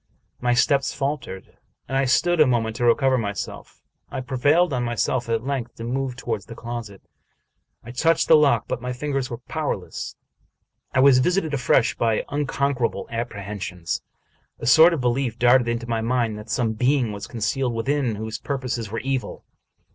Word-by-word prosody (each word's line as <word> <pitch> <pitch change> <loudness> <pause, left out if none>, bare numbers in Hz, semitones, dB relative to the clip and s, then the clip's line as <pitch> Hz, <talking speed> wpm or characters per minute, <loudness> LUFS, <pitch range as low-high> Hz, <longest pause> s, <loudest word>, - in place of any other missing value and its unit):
My 120 0 +1
steps 140 +2 +2
faltered, 135 -9 -4 0.3
and 135 - -3
I 135 0 +2
stood 175 +6 +3
a 150 - +6
moment 115 -3 0
to 120 - 0
recover 130 +2 +3
myself. 100 -3 -6 0.3
I - - -4
prevailed 145 +6 +2
on 125 -1 0
myself 120 +1 -1
at 115 0 0
length 130 -4 -3
to 115 - -8
move 130 +2 -2
toward 115 -4 -3
the 115 - -9
closet. 115 -4 -7 0.8
I 120 - -9
touched 165 +6 +2
the 160 - +8
lock, 140 -7 +3
but - - -3
my 125 +1 -3
fingers 135 0 -2
were 120 - -5
powerless; 125 - -4 0.8
I 130 - +3
was 135 -1 +7
visited 170 +2 +1
afresh 125 -3 +2
by 115 -2 0
unconquerable 140 -3 -1
apprehensions. 100 -6 -4 0.6
A - - -7
sort 160 +7 +7
of 145 - -4
belief 120 -1 0
darted 120 0 +4
into 115 0 -2
my 115 -1 -1
mind 115 -1 0
that 105 +2 -11
some 115 -4 0
being 125 0 +1
was 100 -1 -6
concealed 120 +2 -1
within 130 0 0
whose 110 +1 -5
purposes 125 -6 -3
were 115 +2 -4
evil. 135 -1 -3
125 Hz, 170 wpm, -23 LUFS, 115-135 Hz, 0.8 s, the